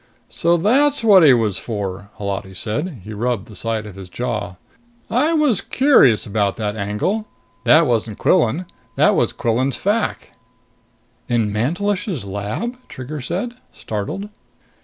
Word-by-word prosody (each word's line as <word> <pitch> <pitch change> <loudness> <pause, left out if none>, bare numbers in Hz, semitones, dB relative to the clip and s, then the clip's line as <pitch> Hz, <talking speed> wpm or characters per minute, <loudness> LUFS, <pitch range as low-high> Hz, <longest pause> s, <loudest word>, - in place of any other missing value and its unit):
"So 170 +1 +2
that's 270 - +2
what 200 -4 +7
he 145 - +8
was 110 -6 +2
for!" 100 -3 -5
Holati 100 -1 -4
said. 115 - -3
He 110 - -8
rubbed 115 -1 -2
the 110 - -12
side 110 +1 -3
of 105 - -9
his 95 -1 -10
jaw. 110 -4 -3 0.6
"I 295 +7 +2
was 295 - +3
curious 250 - +4
about 100 -2 0
that 105 -1 -3
angle! 110 - -2 0.4
That 155 +7 +6
wasn't 115 -4 -1
Quillan. 140 +11 +2 0.3
That - - +4
was - - +2
Quillan's 125 +4 0
fac." 210 +3 -1 1.0
"In 115 -4 +1
Mantelish's 175 - -1
lab?" 105 - -4
Trigger 135 +3 -7
said, 180 - -3 0.2
startled. 110 - -5
120 Hz, 135 wpm, -20 LUFS, -, 1.0 s, he